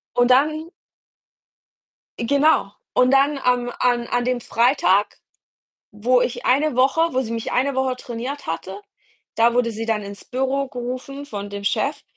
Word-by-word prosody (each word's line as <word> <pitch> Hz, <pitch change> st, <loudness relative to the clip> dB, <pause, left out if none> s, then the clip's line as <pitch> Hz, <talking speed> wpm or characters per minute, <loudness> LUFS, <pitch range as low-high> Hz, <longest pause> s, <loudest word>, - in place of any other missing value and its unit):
Und 245 Hz, 0 st, +3 dB
dann 305 Hz, +5 st, +3 dB, 1.5 s
Genau, 280 Hz, -2 st, +2 dB, 0.2 s
und 250 Hz, 0 st, +3 dB
dann 275 Hz, +2 st, +3 dB
am 250 Hz, -2 st, +1 dB
an 240 Hz, -1 st, +1 dB
an 245 Hz, -, 0 dB
dem 250 Hz, 0 st, 0 dB
Freitag, 225 Hz, -5 st, +2 dB, 0.7 s
wo 245 Hz, +4 st, +2 dB
ich 245 Hz, -, -2 dB
eine 285 Hz, +2 st, +2 dB
Woche 265 Hz, +5 st, +3 dB
wo 260 Hz, -, +2 dB
sie 235 Hz, -4 st, -4 dB
mich 230 Hz, -1 st, -4 dB
eine 270 Hz, +2 st, +1 dB
Woche 265 Hz, -1 st, +1 dB
trainiert 250 Hz, +4 st, -6 dB
hatte, 190 Hz, +5 st, -5 dB, 0.6 s
da 230 Hz, +1 st, +4 dB
wurde 245 Hz, -1 st, +2 dB
sie 225 Hz, +1 st, -5 dB
dann 215 Hz, -2 st, 0 dB
ins 200 Hz, 0 st, -9 dB
Büro 265 Hz, +2 st, -1 dB
gerufen 255 Hz, +3 st, -6 dB
von 205 Hz, -7 st, -6 dB
dem 200 Hz, 0 st, -6 dB
Chef 280 Hz, +7 st, -1 dB
250 Hz, 155 wpm, -22 LUFS, 230-275 Hz, 1.5 s, da